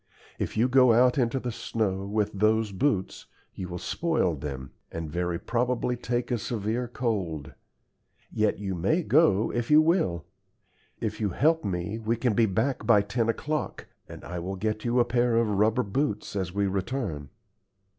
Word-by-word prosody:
If -, -, -3 dB
you 115 Hz, +3 st, +4 dB
go 130 Hz, -2 st, +5 dB
out 125 Hz, +3 st, +4 dB
into 125 Hz, +1 st, +1 dB
the 125 Hz, -1 st, -4 dB
snow 100 Hz, -4 st, -2 dB
with 105 Hz, 0 st, 0 dB
those 110 Hz, +1 st, +2 dB
boots, 100 Hz, -2 st, -1 dB, 0.3 s
you 95 Hz, -, -6 dB
will 90 Hz, 0 st, -5 dB
spoil 160 Hz, -, 0 dB
them, 65 Hz, -3 st, -6 dB, 0.2 s
and 80 Hz, -2 st, -5 dB
very 85 Hz, +1 st, -1 dB
probably 125 Hz, +3 st, -1 dB
take 120 Hz, 0 st, -2 dB
a 120 Hz, -, +1 dB
severe 115 Hz, +3 st, -2 dB
cold. 95 Hz, -, -3 dB, 0.8 s
Yet 110 Hz, -1 st, +1 dB
you 100 Hz, -2 st, -3 dB
may 100 Hz, -, +1 dB
go 135 Hz, -, +3 dB
if 120 Hz, -1 st, -2 dB
you 150 Hz, 0 st, +7 dB
will. 155 Hz, -, +1 dB, 0.7 s
If 110 Hz, -1 st, -3 dB
you 105 Hz, -, +1 dB
help 160 Hz, -, +2 dB
me 95 Hz, +3 st, -3 dB
we 115 Hz, +1 st, 0 dB
can 120 Hz, -1 st, 0 dB
be 115 Hz, +1 st, +3 dB
back 115 Hz, +7 st, -1 dB
by 105 Hz, -4 st, +5 dB
ten 115 Hz, +3 st, -1 dB
o'clock, 150 Hz, +6 st, -2 dB, 0.2 s
and -, -, -10 dB
I 90 Hz, +3 st, -5 dB
will 95 Hz, +3 st, -4 dB
get 110 Hz, +2 st, -2 dB
you 120 Hz, +1 st, +1 dB
a 120 Hz, -, +4 dB
pair 120 Hz, -1 st, +1 dB
of 115 Hz, 0 st, +3 dB
rubber 105 Hz, +4 st, +2 dB
boots 105 Hz, -1 st, -2 dB
as 95 Hz, -3 st, -2 dB
we 100 Hz, +2 st, 0 dB
return." 95 Hz, -, -3 dB
110 Hz, 175 wpm, -27 LUFS, 95-125 Hz, 0.8 s, you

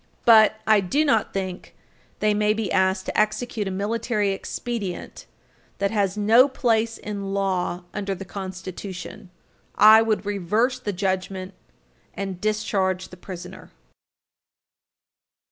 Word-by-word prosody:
But 220 Hz, -2 st, +6 dB
I 215 Hz, -1 st, +5 dB
do 275 Hz, +12 st, +1 dB
not 225 Hz, -8 st, +2 dB
think 185 Hz, -2 st, -5 dB, 0.5 s
they 215 Hz, 0 st, +3 dB
may 210 Hz, 0 st, +2 dB
be 215 Hz, -5 st, -3 dB
asked 190 Hz, 0 st, +1 dB
to -, -, -5 dB
execute 215 Hz, 0 st, 0 dB
a -, -, -1 dB
military 210 Hz, +1 st, -1 dB
expedient 200 Hz, -1 st, -5 dB, 0.5 s
that 200 Hz, 0 st, 0 dB
has 200 Hz, -2 st, 0 dB
no 225 Hz, +6 st, +6 dB
place 230 Hz, -4 st, 0 dB
in 200 Hz, -2 st, -5 dB
law 185 Hz, -2 st, -1 dB
under 200 Hz, -1 st, -3 dB
the 195 Hz, -, -8 dB
Constitution. 185 Hz, 0 st, -7 dB, 0.5 s
I 215 Hz, +2 st, +8 dB
would 215 Hz, -3 st, 0 dB
reverse 210 Hz, +6 st, 0 dB
the 215 Hz, -5 st, -3 dB
judgment 190 Hz, 0 st, -3 dB, 0.6 s
and 190 Hz, -2 st, -5 dB
discharge 195 Hz, -3 st, -1 dB
the -, -, -11 dB
prisoner. 180 Hz, 0 st, -9 dB
200 Hz, 125 wpm, -24 LUFS, 190-215 Hz, 0.6 s, I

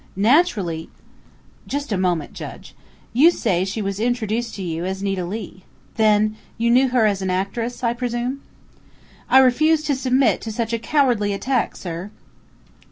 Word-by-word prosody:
Naturally 205 Hz, -, +2 dB, 0.4 s
" -, -, -30 dB
"Just 285 Hz, -2 st, -3 dB
a -, -, +2 dB
moment, 180 Hz, -5 st, -1 dB
Judge. -, -, -9 dB, 0.4 s
You 285 Hz, +8 st, +7 dB
say 190 Hz, -, 0 dB
she 200 Hz, +3 st, -3 dB
was 195 Hz, 0 st, -3 dB
introduced 235 Hz, 0 st, -1 dB
to 195 Hz, -, -5 dB
you 165 Hz, -1 st, -3 dB
as 190 Hz, +1 st, -3 dB
Nita 195 Hz, -2 st, -1 dB
Leigh. 190 Hz, 0 st, -6 dB, 0.3 s
Then 215 Hz, -1 st, +2 dB, 0.2 s
you 235 Hz, +1 st, +1 dB
knew 260 Hz, +2 st, +5 dB
her 245 Hz, -3 st, +2 dB
as 200 Hz, -2 st, +1 dB
an 190 Hz, -, -2 dB
actress, 215 Hz, +7 st, -2 dB
I 235 Hz, -1 st, +2 dB
presume?" 245 Hz, +2 st, -3 dB, 0.9 s
"I -, -, +6 dB
refuse 305 Hz, +5 st, +4 dB
to 290 Hz, -2 st, 0 dB
submit 260 Hz, 0 st, +2 dB
to 225 Hz, -, -5 dB
such 225 Hz, +1 st, -3 dB
a 230 Hz, -, 0 dB
cowardly 240 Hz, -6 st, +1 dB
attack, 250 Hz, +5 st, -1 dB
sir!" 175 Hz, +2 st, -6 dB
225 Hz, 165 wpm, -21 LUFS, 195-255 Hz, 0.9 s, You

